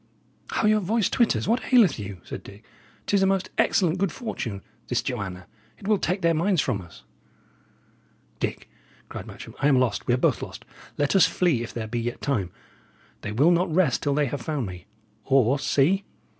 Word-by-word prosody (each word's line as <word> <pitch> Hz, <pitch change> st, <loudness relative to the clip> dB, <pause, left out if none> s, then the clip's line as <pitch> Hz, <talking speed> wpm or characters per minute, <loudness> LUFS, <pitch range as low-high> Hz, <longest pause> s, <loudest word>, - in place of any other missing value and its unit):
"How -, -, +1 dB
your 215 Hz, 0 st, +4 dB
voice 210 Hz, +2 st, 0 dB
twitters! 235 Hz, -3 st, +2 dB
What 240 Hz, +5 st, 0 dB
aileth 220 Hz, -, +5 dB
you?" 100 Hz, -3 st, -7 dB
said -, -, -7 dB
Dick. 100 Hz, +2 st, -14 dB, 0.4 s
"'Tis 200 Hz, -1 st, +2 dB
a 190 Hz, -, +4 dB
most 195 Hz, -1 st, 0 dB
excellent 180 Hz, -2 st, +2 dB
good 195 Hz, -1 st, +1 dB
fortune, 115 Hz, -, -5 dB, 0.2 s
this -, -, 0 dB
Joanna; 95 Hz, -6 st, -4 dB, 0.3 s
it 195 Hz, -, -10 dB
will 210 Hz, -2 st, +3 dB
take 185 Hz, +1 st, -1 dB
their 170 Hz, 0 st, +4 dB
minds 175 Hz, +3 st, +1 dB
from 120 Hz, -8 st, 0 dB
us." 90 Hz, -, -15 dB, 1.4 s
"Dick," -, -, -3 dB, 0.4 s
cried -, -, -7 dB
Matcham, -, -, -10 dB
"I 140 Hz, -, +3 dB
am 140 Hz, -3 st, +5 dB
lost; 125 Hz, -5 st, 0 dB
we 120 Hz, -, +4 dB
are -, -, -1 dB
both -, -, +1 dB
lost. -, -, -8 dB, 0.3 s
Let 145 Hz, +5 st, +1 dB
us 190 Hz, -, +7 dB
flee 170 Hz, -10 st, +1 dB
if 120 Hz, -, -5 dB
there 115 Hz, -2 st, -4 dB
be 120 Hz, +2 st, -3 dB
yet 120 Hz, +1 st, -3 dB
time. 110 Hz, -11 st, -1 dB, 0.7 s
They 105 Hz, -, -4 dB
will 140 Hz, +11 st, +4 dB
not 175 Hz, 0 st, +2 dB
rest 160 Hz, -6 st, +2 dB
till 145 Hz, -1 st, 0 dB
they 150 Hz, 0 st, +2 dB
have 140 Hz, 0 st, -4 dB
found 145 Hz, -1 st, -2 dB
me. 90 Hz, -1 st, -9 dB, 0.4 s
Or, 135 Hz, +1 st, +3 dB
see! 165 Hz, +9 st, +2 dB
145 Hz, 195 wpm, -25 LUFS, 115-190 Hz, 1.4 s, us